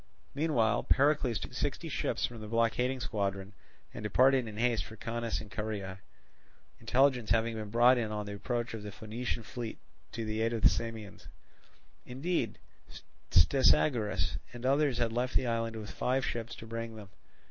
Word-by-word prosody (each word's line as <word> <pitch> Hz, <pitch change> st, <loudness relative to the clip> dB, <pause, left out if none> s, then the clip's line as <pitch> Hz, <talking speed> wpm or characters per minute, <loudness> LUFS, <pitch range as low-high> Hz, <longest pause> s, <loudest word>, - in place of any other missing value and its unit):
Meanwhile 145 Hz, -6 st, +2 dB
Pericles 140 Hz, -5 st, +3 dB
took -, -, -7 dB
sixty -, -, -2 dB
ships -, -, -1 dB
from 115 Hz, -2 st, -7 dB
the 105 Hz, -, -7 dB
blockading 115 Hz, +3 st, +1 dB
squadron, 100 Hz, -3 st, -2 dB, 0.4 s
and -, -, -7 dB
departed 130 Hz, +4 st, +4 dB
in 105 Hz, -1 st, -8 dB
haste 120 Hz, 0 st, +2 dB
for 110 Hz, -, -10 dB
Caunus 115 Hz, +1 st, -3 dB
and 105 Hz, -2 st, -10 dB
Caria, 100 Hz, -3 st, -4 dB, 0.8 s
intelligence 130 Hz, -3 st, +2 dB
having 115 Hz, 0 st, +2 dB
been 110 Hz, -2 st, -5 dB
brought 120 Hz, +3 st, +5 dB
in 110 Hz, -2 st, -2 dB
of 105 Hz, -1 st, -3 dB
the 100 Hz, -, -6 dB
approach 120 Hz, +4 st, -2 dB
of 110 Hz, -, -5 dB
the 105 Hz, 0 st, -7 dB
Phoenician 115 Hz, +4 st, -4 dB
fleet 115 Hz, 0 st, -6 dB, 0.4 s
to 115 Hz, -, -3 dB
the 110 Hz, 0 st, -2 dB
aid 115 Hz, +1 st, +1 dB
of 115 Hz, -, -3 dB
the -, -, +9 dB
Samians; 110 Hz, -3 st, -5 dB, 0.8 s
indeed 130 Hz, -, -2 dB, 0.7 s
Stesagoras 105 Hz, -, +3 dB
and 120 Hz, +1 st, -7 dB
others 140 Hz, -1 st, +3 dB
had 120 Hz, -2 st, 0 dB
left 125 Hz, +2 st, -1 dB
the 130 Hz, -, +3 dB
island 115 Hz, -1 st, -1 dB
with 110 Hz, -2 st, -6 dB
five 130 Hz, +1 st, 0 dB
ships 115 Hz, -1 st, -4 dB
to -, -, -10 dB
bring 115 Hz, 0 st, -5 dB
them. 105 Hz, -3 st, -10 dB
115 Hz, 170 wpm, -31 LUFS, 110-125 Hz, 0.8 s, the